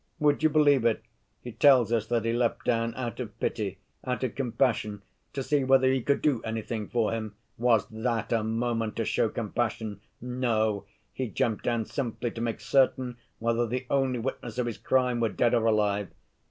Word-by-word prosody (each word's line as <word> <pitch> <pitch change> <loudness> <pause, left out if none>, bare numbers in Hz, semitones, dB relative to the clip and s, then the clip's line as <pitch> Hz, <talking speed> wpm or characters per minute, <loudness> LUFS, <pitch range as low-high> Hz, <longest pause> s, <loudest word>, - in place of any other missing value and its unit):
Would 150 -2 +2
you 155 - +4
believe 145 -4 +4
it, 115 -2 +1 0.4
he 120 - -6
tells 125 -2 +5
us 110 -2 +1
that 115 -1 0
he 115 - +1
leapt 120 -1 0
down 115 -1 +1
out 120 -2 -4
of 115 -3 -6
pity, 100 -4 -2 0.3
out 125 0 -2
of 125 - -1
compassion, 115 -5 0 0.3
to 135 - -2
see 145 0 +1
whether 130 0 +4
he 130 - +1
could 140 +4 0
do 140 -7 +2
anything 110 -1 -4
for 115 -3 0
him. 110 -2 -4 0.2
Was 115 -2 +3
that 115 0 -2
a 115 -2 +1
moment 115 0 -1
to 115 - -1
show 110 - +1
compassion? 110 -2 -3 0.2
No; 115 -4 0 0.3
he 130 - -2
jumped 110 0 -1
down 115 -2 0
simply 120 -3 -3
to 115 - -6
make 115 -1 -2
certain 130 -2 +2 0.2
whether 115 +1 0
the 125 +3 -3
only 135 -2 +2
witness 120 -1 -4
of 125 - +1
his 120 -2 -4
crime 125 -2 +1
were 115 -1 +2
dead 120 +3 +1
or 115 -2 +3
alive. 105 -2 +2
120 Hz, 190 wpm, -28 LUFS, 110-130 Hz, 0.4 s, tells